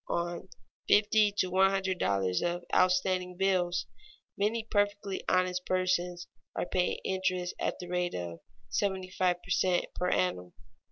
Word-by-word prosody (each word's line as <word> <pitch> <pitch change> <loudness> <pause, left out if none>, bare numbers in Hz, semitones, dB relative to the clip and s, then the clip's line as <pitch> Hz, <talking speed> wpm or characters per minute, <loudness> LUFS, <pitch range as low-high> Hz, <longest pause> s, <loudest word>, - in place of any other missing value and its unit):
On 175 +2 -2 0.4
fifty 210 0 +4
to 185 -3 +1
one 190 +1 +5
hundred 190 -2 -1
dollars 95 -2 +1
of 175 0 -2
outstanding 185 0 +2
bills, 180 -2 +1 0.5
many 220 +3 0
perfectly 205 -2 -1
honest 185 0 +1
persons 180 -1 0 0.3
are - - -1
paying 180 0 0
interest 185 -1 -1
at - - -1
the 180 - -8
rate 180 0 -1
of 85 -1 -5 0.3
seventy 190 -2 -1
five 180 -2 0
per 180 - -9
cent. 180 -1 +2
per 180 - -1
annum. 90 - 0
185 Hz, 145 wpm, -30 LUFS, 175-190 Hz, 0.5 s, one